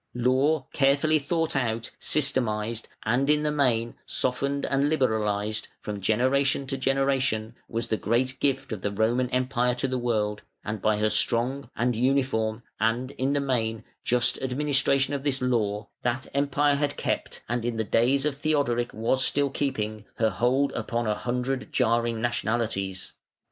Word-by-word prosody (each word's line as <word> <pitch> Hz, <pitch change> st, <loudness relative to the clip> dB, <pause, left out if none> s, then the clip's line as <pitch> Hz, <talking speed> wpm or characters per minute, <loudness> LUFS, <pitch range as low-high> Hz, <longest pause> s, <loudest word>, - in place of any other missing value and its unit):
] -, -, -52 dB
Law 130 Hz, +4 st, +2 dB
carefully 145 Hz, +3 st, +3 dB
thought 165 Hz, +2 st, -1 dB
out, 115 Hz, -3 st, -1 dB
systematised, 115 Hz, -6 st, 0 dB, 0.2 s
and 125 Hz, +5 st, +1 dB
in 150 Hz, 0 st, +3 dB
the 150 Hz, -, +1 dB
main 120 Hz, -6 st, +1 dB
softened 140 Hz, +2 st, -1 dB
and 140 Hz, +1 st, +1 dB
liberalised, 110 Hz, -6 st, 0 dB
from 105 Hz, -1 st, -5 dB
generation 130 Hz, +7 st, +2 dB
to 135 Hz, 0 st, -2 dB
generation, 135 Hz, -4 st, 0 dB, 0.2 s
was 115 Hz, 0 st, -2 dB
the 110 Hz, -2 st, -1 dB
great 130 Hz, +5 st, 0 dB
gift 135 Hz, -2 st, 0 dB
of 105 Hz, -4 st, -4 dB
the 100 Hz, -, 0 dB
Roman 115 Hz, +5 st, +1 dB
Empire 125 Hz, -1 st, +1 dB
to 125 Hz, -, -1 dB
the 130 Hz, -1 st, -1 dB
world, 105 Hz, -3 st, 0 dB, 0.2 s
and 105 Hz, -1 st, -3 dB
by 110 Hz, -1 st, +2 dB
her 105 Hz, 0 st, +1 dB
strong, 125 Hz, +2 st, +1 dB
and 120 Hz, 0 st, +1 dB
uniform, 120 Hz, -3 st, +1 dB, 0.2 s
and, 120 Hz, +4 st, 0 dB
in 140 Hz, 0 st, -1 dB
the 145 Hz, -, +2 dB
main, 115 Hz, -5 st, -1 dB, 0.2 s
just 125 Hz, 0 st, +1 dB
administration 135 Hz, +1 st, +1 dB
of 140 Hz, -1 st, -2 dB
this 140 Hz, -2 st, 0 dB
law, 105 Hz, -5 st, 0 dB
that 125 Hz, +2 st, -1 dB
Empire 145 Hz, +1 st, +2 dB
had 145 Hz, 0 st, 0 dB
kept, -, -, -3 dB
and 120 Hz, 0 st, -1 dB
in 120 Hz, -1 st, -2 dB
the 110 Hz, -, +1 dB
days 130 Hz, +6 st, +2 dB
of 145 Hz, -2 st, -1 dB
Theodoric 140 Hz, -6 st, 0 dB
was 120 Hz, +4 st, +1 dB
still 140 Hz, 0 st, +1 dB
keeping, 110 Hz, -7 st, -2 dB
her 110 Hz, -1 st, +2 dB
hold 125 Hz, +8 st, +2 dB
upon 120 Hz, -1 st, -2 dB
a 105 Hz, -, +1 dB
hundred 125 Hz, +4 st, -2 dB
jarring 115 Hz, -2 st, +1 dB
nationalities. 110 Hz, -4 st, -2 dB
125 Hz, 160 wpm, -26 LUFS, 110-135 Hz, 0.2 s, carefully